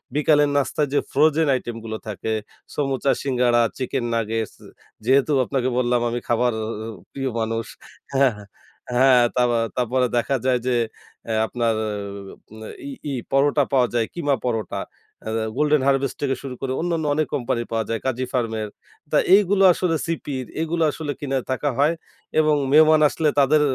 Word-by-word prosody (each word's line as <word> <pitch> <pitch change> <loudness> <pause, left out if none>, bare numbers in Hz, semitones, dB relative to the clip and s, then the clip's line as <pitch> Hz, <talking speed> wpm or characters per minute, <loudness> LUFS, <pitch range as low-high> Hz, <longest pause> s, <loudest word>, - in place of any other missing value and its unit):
বিকালের 150 -1 +4
নাস্তায় 145 +1 0
যে - - +4
ফ্রোজেন 155 +2 +3
আইটেমগুলো 115 -3 -5
থাকে, 110 +1 -3 0.4
সমুচা, 135 -1 0
সিঙ্গাড়া, 125 -3 +2 0.2
চিকেন 130 -1 -2
নাগেটস। 115 -1 -2 0.5
যেহেতু 135 +4 +3
আপনাকে 130 0 -1
বললাম, 125 -1 +2
আমি 120 +1 -2
খাবার 120 0 +2 0.6
প্রিয় 135 -1 -3
মানুষ। 115 0 -2 0.5
হ্যাঁ, 135 -1 +4
হ্যাঁ। 105 -1 -12 0.5
হ্যাঁ, 125 0 +5
তারপ 125 -1 +3 0.3
তারপরে 125 +1 +1
দেখা 135 +3 +1
যায় 130 -1 +3
যে, 125 - +2 0.5
অ্যা 110 - -1
আপনার 115 -2 0 1.1
ই - - -6 0.2
ই - - -2 0.2
পরোটা 140 +2 +3
পাওয়া 130 -2 +3
যায়, 115 -2 +2
কিমা 145 -5 0
পরোটা, 110 -4 -2 0.5
আ - - -2 0.3
গোল্ডেন 150 -1 +3
হারভেস্ট 135 -1 +1
থেকে 135 -2 0
শুরু 135 -2 -6
করে 135 - -2
অন্যান্য 165 -2 -1
অনেক 155 0 +1
কোম্পানির 120 -2 -2
পাওয়া 115 -1 0
যায়, 115 0 -1
কাজী 130 -1 -1
ফার্মের। 110 -4 -1 0.4
তা - - +3 0.2
এইগুলো 200 -1 +3
আসলে 175 -1 0
সিপির, 145 -5 -3 0.2
এগুলো 165 +1 0
আসলে 150 -2 -4
কিনে 135 -2 -1
থাকা 140 +3 0
হয়। 150 +3 +4 0.5
এবং 155 -1 +4 0.2
মেহমান 155 +1 +6
আসলে 155 0 +1
তাদের 145 +2 +4
130 Hz, 150 wpm, -22 LUFS, 120-145 Hz, 1.1 s, মেহমান